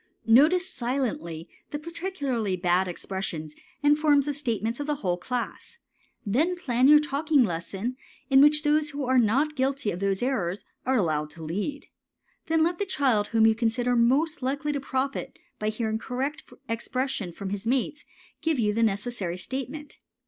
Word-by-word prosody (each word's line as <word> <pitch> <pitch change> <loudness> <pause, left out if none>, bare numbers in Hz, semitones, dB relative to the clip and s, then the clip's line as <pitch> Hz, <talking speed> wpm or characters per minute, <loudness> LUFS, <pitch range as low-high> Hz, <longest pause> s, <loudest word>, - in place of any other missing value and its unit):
Notice 310 +11 +5
silently 235 - -3 0.2
the 295 - -3
peculiarly 295 - -2
bad 180 +1 +2
expressions 175 -4 -4 0.3
and 295 +1 +4
forms 295 -2 +4
of 290 - -1
statements 235 -4 -2
of 290 - -3
the 300 - +1
whole 175 -1 +2
class, 250 - -5 0.5
then 300 - +1
plan 255 -6 +2
your 300 +1 +9
talking 295 -1 +2
lesson 195 +6 -3 0.3
in 270 -1 +6
which 300 +1 +5
those 300 0 +2
who 285 -2 -4
are 255 0 +4
not 270 +7 +2
guilty 265 -4 0
of 175 - -5
those 195 +2 0
errors 205 -8 -1 0.2
are 265 - +3
allowed 155 -6 0
to 160 +2 -11
lead. 205 - -3 0.6
Then 325 -1 +3
let 340 +1 0
the 405 - 0
child 250 - +2
whom 225 -1 +3
you 225 - +6
consider 240 +2 0
most 270 +7 +2
likely 285 +4 -1
to 285 - -2
profit 270 0 -3 0.2
by 215 - 0
hearing 220 0 -2
correct 265 +6 -4 0.2
expression 235 -3 -2
from 195 +3 -6
his 205 +2 -4
mates 270 +4 0 0.4
give 320 -2 +1
you 210 -3 +1
the 230 - 0
necessary 205 -4 -1
statement. 270 +8 -5
255 Hz, 165 wpm, -26 LUFS, 210-290 Hz, 0.6 s, your